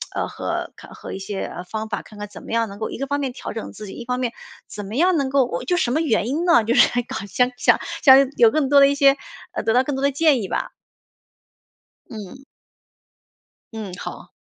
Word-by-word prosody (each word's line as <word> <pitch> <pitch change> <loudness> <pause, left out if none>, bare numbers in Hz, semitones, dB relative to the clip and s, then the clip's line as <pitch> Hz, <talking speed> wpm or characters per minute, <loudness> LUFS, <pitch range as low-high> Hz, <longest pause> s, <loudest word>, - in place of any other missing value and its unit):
呃， - - 0
和 - - -4
看 - - -14
和 - - -9
一 195 - -5
些， 195 0 -5
呃， 175 - -7
方 220 +2 -5
法， 210 - -3
看 210 - -15
看 210 0 -6
怎 - - -12
么 - - -7
样 230 -2 +1
能 200 +2 -10
够， 220 - -3
一 - - -6
个 275 +1 -3
方 285 +1 -1
面 265 -3 -3
调 - - -7
整 225 - -6
自 210 -1 -9
己， - - -8
一 235 - -8
方 250 +1 -2
面 240 -2 -1 0.4
怎 205 -1 -7
么 210 +4 -7
样 350 +3 +3
能 275 -2 0
够 275 -1 +3
我 170 -8 -4
就 355 - +1
什 245 -9 +1
么 310 - +1
原 225 -7 +1
因 320 +6 -1
呢， 335 -10 +5
就 230 +2 +1
是 - - +7
想 245 0 -1
搞 - - -6
想 250 +5 +1
想 - - +4 0.2
想 270 -1 +7
有 230 -2 +7
更 275 +1 0
多 285 -1 +6
的 275 - +7
一 280 - +1
些 275 0 +5 0.3
呃， - - -4
得 225 - +1
到 250 +1 +4
更 285 0 -3
多 - - -3
的 280 - +3
建 285 -5 +3
议 190 - -4
吧。 - - -3 1.4
嗯。 225 +5 -9 1.3
嗯， 210 -5 -6
好。 - - -8
250 Hz, 265 characters per minute, -22 LUFS, 220-275 Hz, 1.4 s, 是